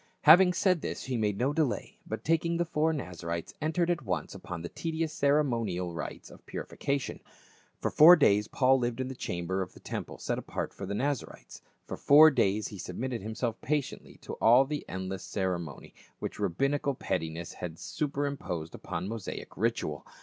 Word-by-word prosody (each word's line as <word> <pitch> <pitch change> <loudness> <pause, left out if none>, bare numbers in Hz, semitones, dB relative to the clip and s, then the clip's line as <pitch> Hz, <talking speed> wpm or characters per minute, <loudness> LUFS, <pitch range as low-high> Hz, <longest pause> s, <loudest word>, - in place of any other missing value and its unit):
Having 180 +4 +8
said 180 -2 +2
this - - -4
he 130 - -3
made 105 -3 0
no 130 +5 +1
delay, 150 -5 -1
but - - -5
taking 165 +1 +1
the 175 - +1
four 160 -1 +1
Naza 90 - -6
rites 85 0 -3
entered 165 +3 +1
at 170 -3 -1
once 95 -8 -3
upon 85 -2 -7
the 85 - -5
tedious 160 -1 -3
ceremonial 115 - +1
rites 85 - -6
of - - -15
purification. 140 -1 -3 0.6
For - - -1
four 165 +4 +9
days 105 - +3
Paul 130 0 +3
lived 120 0 -2
in 130 0 -2
the - - -4
chamber 90 -4 -3
of 90 - -5
the - - -13
temple - - -6
set - - -2
apart - - -4
for 100 - -7
the 100 - -3
Nazarites; 140 +3 -3 0.2
for - - -6
four 155 +2 +8
days 105 -5 +1
he 100 - -9
submitted 115 +7 -4
himself 110 +2 -3
patiently 150 -1 -3
to - - -6
all 120 +4 +7
the 150 +1 -4
endless 95 0 -4
cere 95 -3 -1
monial 80 -5 -9 0.2
which - - -6
rabbinical 140 +8 0
pettiness 85 -5 -3
had 85 -2 -6
superimposed 140 - -3
upon 85 +3 -5
Mosaic 110 -2 -6
ritual. 100 - -1
120 Hz, 180 wpm, -30 LUFS, 95-150 Hz, 0.6 s, four